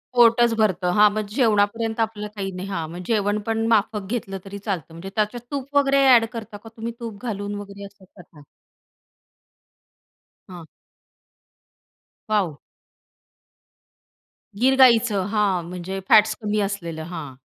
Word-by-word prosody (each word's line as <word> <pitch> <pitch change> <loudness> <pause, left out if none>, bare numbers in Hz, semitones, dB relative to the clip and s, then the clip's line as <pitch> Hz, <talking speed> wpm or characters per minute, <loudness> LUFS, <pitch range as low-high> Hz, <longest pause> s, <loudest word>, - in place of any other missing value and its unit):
पोटचं 235 -1 +5
भरतं. 190 -5 +1
हां, 210 0 +7
मग 215 0 -2
जेवणापर्यंत 225 -1 +1
आपलं 220 -2 -2
काही 195 -2 -4
नाही. 185 +1 -6
हां, 165 -5 -3
मग 175 +1 -7
जेवण 210 -2 +1
पण 225 0 0
माफक 210 -1 0
घेतलं 210 -5 -3
तरी 200 +1 -8
चालतं. 190 -7 -4
म्हणजे 170 +4 -8
त्याच्यात 215 +3 -1
तूप 280 0 -5
वगैरे 275 -1 +3 0.2
एड 230 -1 +4
करता 225 -2 -7
का 225 +2 -13
तुम्ही? 230 +1 -5
तूप 225 -4 -8
घालून 205 -2 -4
वगैरे 200 0 -9
असं 200 -1 -16
करता? 170 -4 -18 2.1
हां. 175 -3 -10 1.6
वॉव. 190 -9 0 2.0
गीर 260 +4 +3
गाईचं, 235 -6 +5
हां 200 -5 +1
म्हणजे 180 +2 -5
फॅट्स 215 0 +6
कमी 210 0 -1
असलेलं, 170 -5 -4
हां. 150 -7 -7
205 Hz, 135 wpm, -23 LUFS, 195-225 Hz, 2.1 s, हां